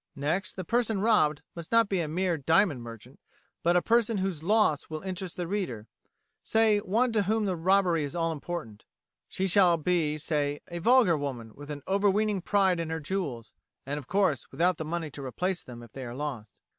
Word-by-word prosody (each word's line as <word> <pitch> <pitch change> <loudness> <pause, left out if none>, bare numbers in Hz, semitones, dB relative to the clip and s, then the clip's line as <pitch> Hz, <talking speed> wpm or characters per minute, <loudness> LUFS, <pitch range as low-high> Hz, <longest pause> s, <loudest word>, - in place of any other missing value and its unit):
Next, 165 +7 -1
the 185 - -5
person 225 +1 0
robbed 190 -9 +2
must 170 -2 -8
not 230 -1 +5
be 195 -2 0
a 165 - -1
mere 175 +3 0
diamond 160 -1 +2
merchant, 115 +2 -11 0.4
but 175 +1 +2
a 175 - +3
person 230 -1 +2
whose 190 -5 -2
loss 185 -5 +2
will 155 +1 -6
interest 185 -2 -5
the 175 - -2
reader, 170 - -3 0.6
say, 220 -2 +3
one 225 +6 +1
to 220 -2 +2
whom 215 +2 0
the 190 -2 0
robbery 175 -1 +2
is 145 +3 -5
all 165 -1 0
important. 155 -8 -6 0.5
She 190 - -2
shall 180 -2 +5
be, 160 -2 0
say, 145 -1 -1
a 170 0 -5
vulgar 230 -2 +5
woman 125 -6 -5
with 145 +1 -11
an 145 -2 -6
overweening 200 +1 +1
pride 190 -2 +2
in 165 -1 -3
her 160 0 -2
jewels, 150 - -4 0.3
and, 145 +2 -3
of 145 - -12
course, 185 -8 +1
without 175 +5 +1
the 160 - -4
money 165 -1 -3
to 140 - -8
replace 180 +8 -2
them 120 -1 -11
if 115 - -14
they 135 - -8
are 120 -1 -7
lost. 130 -8 -6
170 Hz, 200 wpm, -28 LUFS, 145-195 Hz, 0.6 s, not